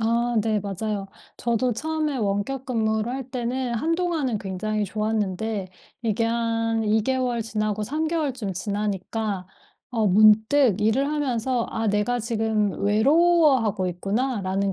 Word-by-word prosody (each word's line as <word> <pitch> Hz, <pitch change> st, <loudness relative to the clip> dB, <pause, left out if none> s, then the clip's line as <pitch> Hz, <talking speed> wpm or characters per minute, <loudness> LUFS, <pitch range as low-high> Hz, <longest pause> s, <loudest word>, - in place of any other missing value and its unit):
아 235 Hz, +2 st, +1 dB
네. 215 Hz, -1 st, +1 dB
맞아요. 200 Hz, +1 st, -3 dB, 0.3 s
저도 235 Hz, +1 st, 0 dB
처음에 305 Hz, +3 st, -2 dB
원격 220 Hz, +5 st, -2 dB
근무를 220 Hz, -2 st, 0 dB
할 265 Hz, -1 st, -5 dB
때는 250 Hz, 0 st, -2 dB
한동안은 325 Hz, -4 st, 0 dB
굉장히 210 Hz, +2 st, -2 dB
좋았는데 210 Hz, -1 st, -2 dB, 0.3 s
이게 230 Hz, 0 st, 0 dB
한 230 Hz, -1 st, 0 dB
2 215 Hz, +1 st, +2 dB
개월 250 Hz, -1 st, 0 dB
지나고 215 Hz, -1 st, -2 dB
3 305 Hz, +7 st, -1 dB
개월쯤 270 Hz, -, -2 dB
지나니까 205 Hz, 0 st, -3 dB, 0.4 s
어 225 Hz, -3 st, +1 dB
문득 215 Hz, +3 st, +5 dB
일을 220 Hz, +6 st, +2 dB
하면서 260 Hz, -5 st, -1 dB
'아 225 Hz, 0 st, -2 dB
내가 210 Hz, +4 st, +1 dB
지금 220 Hz, -3 st, 0 dB
외로워하고 260 Hz, -, +3 dB
있구나.'라는 195 Hz, +1 st, -1 dB
225 Hz, 275 characters per minute, -24 LUFS, 210-255 Hz, 0.4 s, 문득